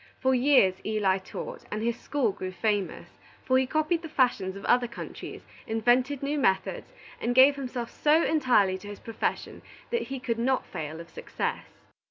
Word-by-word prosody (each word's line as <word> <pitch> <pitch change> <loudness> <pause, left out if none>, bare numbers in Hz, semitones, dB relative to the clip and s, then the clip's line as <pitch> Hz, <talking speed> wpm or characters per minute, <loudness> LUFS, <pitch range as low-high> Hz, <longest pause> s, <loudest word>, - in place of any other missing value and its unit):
For 260 0 +2
years 255 -7 +5
Eli 205 -3 +1
taught, 190 - -8
and 215 +1 -3
his 235 0 0
school 250 -2 -1
grew 185 -1 -6
famous; 205 0 -2 0.3
for 260 0 +4
he 260 - 0
copied 310 +4 0
the 325 - -8
fashions 240 -10 +1
of 200 - -8
other 245 0 +3
countries, 235 - -8 0.2
invented 245 +5 +2
new 290 +1 -1
methods, 190 - 0 0.3
and 245 +1 -1
gave 270 +2 +7
himself 250 -3 -5
so 310 +2 +3
entirely 240 -11 +3
to 205 - -11
his 205 0 -8
profession 225 -1 -3 0.3
that 470 - -1
he 270 -1 -4
could 230 -2 -2
not 260 +2 +1
fail 155 +1 -6
of 170 0 -11
success. - - -4
245 Hz, 175 wpm, -27 LUFS, 205-270 Hz, 0.3 s, gave